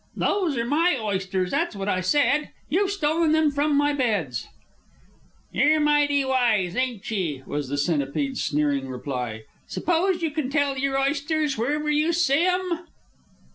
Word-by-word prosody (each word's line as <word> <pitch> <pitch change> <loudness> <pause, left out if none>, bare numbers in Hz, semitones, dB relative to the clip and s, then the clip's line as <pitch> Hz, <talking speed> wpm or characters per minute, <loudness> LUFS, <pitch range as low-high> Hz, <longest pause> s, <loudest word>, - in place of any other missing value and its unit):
"Those 355 -9 0
are 235 - 0
my 305 +4 +2
oysters 190 -3 -2
that's 335 -9 -1
what 195 0 -4
I 185 -2 +1
said. 285 +8 +2 0.2
You've 380 +7 +1
stolen 325 -4 +1
them 315 -2 +3
from 290 +1 +1
my 290 0 +2
beds." 205 - -1 1.0
"Yer 305 +2 +3
mighty 290 -2 +3
wise, 230 -9 +1
ain't 250 -5 -2
ye?" 165 -10 -2
was 145 -2 -4
the 145 - -2
Centipede's 155 - -1
sneering 145 -2 0
reply. 125 -4 -5 0.2
"S'pose 350 +1 0
you 320 - 0
can 290 -3 -2
tell 285 -1 +1
your 270 0 0
oysters 290 +1 0
wherever 295 +6 -1
you 305 +3 +2
see 330 0 +3
'em?" 360 -2 -1
275 Hz, 150 wpm, -24 LUFS, 190-310 Hz, 1.0 s, them